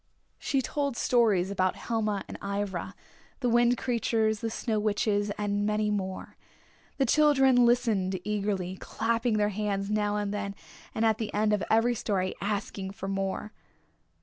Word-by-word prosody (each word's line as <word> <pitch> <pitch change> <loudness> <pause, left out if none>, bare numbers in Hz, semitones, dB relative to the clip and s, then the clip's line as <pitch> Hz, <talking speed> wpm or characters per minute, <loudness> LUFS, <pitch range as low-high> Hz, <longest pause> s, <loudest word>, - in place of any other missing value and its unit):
She 270 -2 0
told 280 -3 -2
stories 210 -7 +2
about 185 -2 +1
Helma 215 -4 -2
and - - -8
Ivra, 200 -2 -3 0.5
the 250 - +1
Wind 240 +1 +4
Creatures, 225 -3 0
the 225 - -2
Snow 220 -1 -1
Witches 205 -1 +1
and 205 0 -1
many 210 0 +1
more. 190 -2 -4 0.6
The 270 - +2
children 265 -3 +5
listened 215 -6 +1
eagerly, 200 -3 -2
clapping 230 +1 -1
their 210 0 +2
hands 200 -1 -2
now 210 -1 +1
and 205 -1 -2
then, 200 -1 -3 0.4
and 225 - +1
at 220 -1 +2
the 220 -2 -3
end 210 0 +2
of 205 -4 +1
every 225 +2 +3
story 190 -5 -1
asking 200 -1 -3
for 195 -2 -6
more. 195 +2 -3
210 Hz, 150 wpm, -28 LUFS, 200-230 Hz, 0.6 s, children